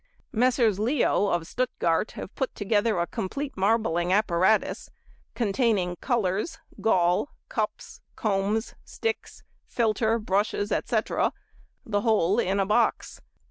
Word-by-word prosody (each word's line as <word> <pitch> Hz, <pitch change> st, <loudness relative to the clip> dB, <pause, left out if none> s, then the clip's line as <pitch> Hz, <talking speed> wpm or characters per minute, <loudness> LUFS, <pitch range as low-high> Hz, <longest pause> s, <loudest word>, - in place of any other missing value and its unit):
Messrs. 235 Hz, -3 st, +2 dB
Leo, 235 Hz, -2 st, +2 dB
of 175 Hz, -4 st, 0 dB
Stuttgart, 190 Hz, -5 st, -1 dB
have -, -, -8 dB
put 265 Hz, -, -3 dB
together 205 Hz, 0 st, +1 dB
a 170 Hz, -, +1 dB
complete 275 Hz, -, -4 dB
marbling 190 Hz, -4 st, +1 dB
apparatus, 190 Hz, 0 st, +2 dB, 0.5 s
containing 205 Hz, -5 st, +1 dB
colours, 230 Hz, -, -1 dB, 0.2 s
gall, 180 Hz, +2 st, +2 dB, 0.2 s
cups, -, -, -4 dB
combs, 210 Hz, +2 st, -1 dB
sticks, 455 Hz, 0 st, -4 dB, 0.2 s
filter, 225 Hz, -1 st, +1 dB
brushes, 205 Hz, 0 st, -1 dB
etc., -, -, 0 dB, 0.5 s
the 205 Hz, -2 st, 0 dB
whole 210 Hz, -2 st, +2 dB
in 195 Hz, -2 st, +1 dB
a 195 Hz, -, +2 dB
box. 220 Hz, +4 st, 0 dB
210 Hz, 110 wpm, -26 LUFS, 190-230 Hz, 0.5 s, Messrs